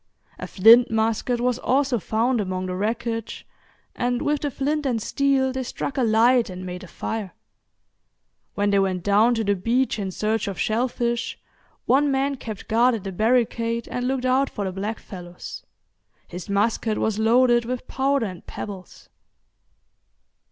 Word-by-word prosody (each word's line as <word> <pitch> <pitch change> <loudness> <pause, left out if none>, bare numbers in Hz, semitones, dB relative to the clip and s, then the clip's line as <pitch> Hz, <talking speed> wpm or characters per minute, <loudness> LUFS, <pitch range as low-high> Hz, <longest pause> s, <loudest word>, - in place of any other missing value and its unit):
A - - -5
flint 230 +5 +6
musket 225 +2 0
was 245 0 0
also 265 -2 +1
found 230 +4 0
among 185 -1 -3
the 180 0 -3
wreckage, 225 +3 -3 0.5
and 245 0 0
with 295 0 0
the 290 - -1
flint 290 +3 -1
and 250 -5 0
steel 270 +3 +1
they 260 0 -3
struck 260 +2 -4
a 270 - 0
light 230 +1 +4
and 185 0 -7
made 180 0 -6
a - - -10
fire. 205 0 -5 1.2
When 205 0 +1
they 200 - +3
went 185 -2 0
down 210 +4 +4
to 225 - -1
the 205 -1 +2
beach 230 +5 0
in 195 -2 -2
search 215 +3 -1
of 195 - -5
shellfish, 235 +1 -1 0.5
one 285 +2 +3
man 275 +1 +1
kept 215 -5 -8
guard 235 +2 +3
at 210 - -6
the 195 - -4
barricade, 230 +2 0
and 245 0 -2
looked 260 -1 -1
out 265 +2 +2
for 200 - -4
the 190 - -3
blackfellows; 190 -3 -7 0.6
his 180 +2 -8
musket 215 +2 0
was 220 -1 -1
loaded 240 +1 +4
with 250 +1 -4
powder 270 -1 0
and 185 -4 -7
pebbles. 190 -3 -8
230 Hz, 160 wpm, -23 LUFS, 205-255 Hz, 1.2 s, flint